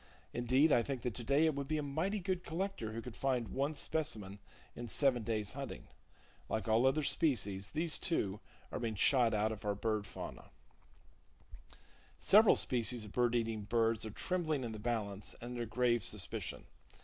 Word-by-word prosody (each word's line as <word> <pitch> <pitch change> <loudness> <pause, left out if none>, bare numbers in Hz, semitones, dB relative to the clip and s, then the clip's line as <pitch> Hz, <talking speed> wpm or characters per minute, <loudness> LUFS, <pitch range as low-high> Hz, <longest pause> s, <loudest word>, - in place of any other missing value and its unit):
Indeed, 130 +6 +3
I 120 - +5
think 130 0 -4
that 125 - -1
today 140 +7 +2
it 160 - +3
would 140 -1 -4
be 155 +1 0
a 150 - -1
mighty 165 +9 -1
good 185 -1 -2
collector 180 - -3
who 115 +1 -5
could 125 -3 -8
find 125 -4 0
one 140 +3 -1
specimen 110 -13 -1 0.4
in 120 - -6
seven 130 0 +2
days' 105 -2 -1
hunting. - - -7 0.6
Like 110 -3 -2
all 115 +4 +4
other 150 +3 +2
species, 100 - +1
these, 160 +1 0
too, 105 - 0 0.3
are - - -3
being 115 -2 -2
shot 120 +2 +4
out 105 +1 +1
of 110 - -7
our 105 -1 0
bird 105 0 -1
fauna. - - -8 1.7
Several 215 +2 +6
species 120 -2 +1
of 105 - -10
bird 120 0 +2
eating 115 -2 0
birds 115 +1 +1
are 110 - -4
trembling 155 - -1
in 115 - -3
the 110 - -6
balance, 105 -3 -3
and 120 +1 -7
under 120 -1 -3
grave 120 -1 +2
suspicion. - - -3
120 Hz, 175 wpm, -35 LUFS, 110-145 Hz, 1.7 s, Several